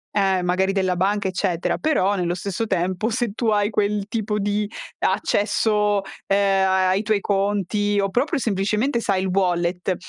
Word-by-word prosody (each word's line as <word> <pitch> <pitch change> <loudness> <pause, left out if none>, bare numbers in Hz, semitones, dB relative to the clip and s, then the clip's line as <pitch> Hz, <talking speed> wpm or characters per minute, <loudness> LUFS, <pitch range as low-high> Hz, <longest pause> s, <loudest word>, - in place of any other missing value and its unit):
eh, 190 -2 +2
magari 190 +2 +1
della 185 -2 0
banca 195 +2 0
eccetera; 185 -2 -1
però 205 -11 +1
nello 175 -1 -1
stesso 200 +4 -3
tempo 185 +4 -1
se 235 -2 -1
tu 230 +2 -3
hai 205 0 +2
quel 205 -1 0
tipo 215 -1 -2
di 205 +1 -1 0.3
accesso, 210 0 +1 0.3
ehm, 195 -1 +2
ai 190 0 +2
ai - - 0
tuoi 215 -1 +1
conti 205 +1 0
o 195 0 +1
proprio 285 - 0
semplicemente 220 +4 0
sai 195 -4 0
il 190 - -1
wallet, 180 -1 0
200 Hz, 160 wpm, -22 LUFS, 190-210 Hz, 0.3 s, eh